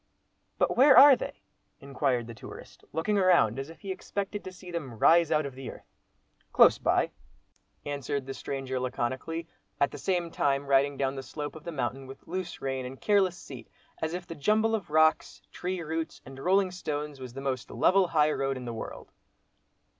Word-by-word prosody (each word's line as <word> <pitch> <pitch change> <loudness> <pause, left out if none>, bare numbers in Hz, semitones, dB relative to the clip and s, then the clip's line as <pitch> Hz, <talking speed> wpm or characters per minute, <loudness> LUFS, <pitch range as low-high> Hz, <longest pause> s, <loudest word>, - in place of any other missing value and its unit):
"But - - +1
where 270 +2 +7
are 280 -1 +10
they?" - - -7 0.4
inquired 135 -3 -1
the 115 - -8
tourist, 110 - -12
looking 200 +7 0
around, 170 - +4
as 135 +3 -5
if 165 - -13
he 195 - -5
expected 200 +2 -4
to 185 - -7
see 180 -1 -11
them 140 -9 -5
rise 165 +6 +5
out 150 -1 +2
of 140 - -6
the 130 0 -7
earth. - - -11 0.7
"Close - - +6
by," - - +1 0.7
answered 140 -1 -3
the 135 - -5
stranger, 135 -1 -4
laconically, 130 +6 -3 0.3
at 140 - +2
the - - -8
same 175 -3 -1
time 140 -2 0
riding 140 0 +2
down 135 0 0
the 135 - -5
slope 145 +3 -6
of 160 - -11
the 170 - -4
mountain 135 -2 -3
with 135 +1 -12
loose 185 0 -5
rein, 135 -1 -2
and 130 +1 -8
careless 195 -4 +2
seat, 130 -8 -11 0.3
as 160 +2 -1
if 180 -1 -6
the 165 - -7
jumble 215 +8 +2
of 210 -8 -2
rocks, 155 +1 +3
tree 180 0 -4
roots, 160 +1 -4
and 135 0 -11
rolling 185 +4 +2
stones, 150 -5 -4
was 130 -2 -8
the 135 - -7
most 130 -5 -3
level 190 0 +3
high 155 -2 +3
road 135 -2 -1
in 125 - -7
the 120 - -4
world. 110 - -8
150 Hz, 190 wpm, -28 LUFS, 135-180 Hz, 0.7 s, are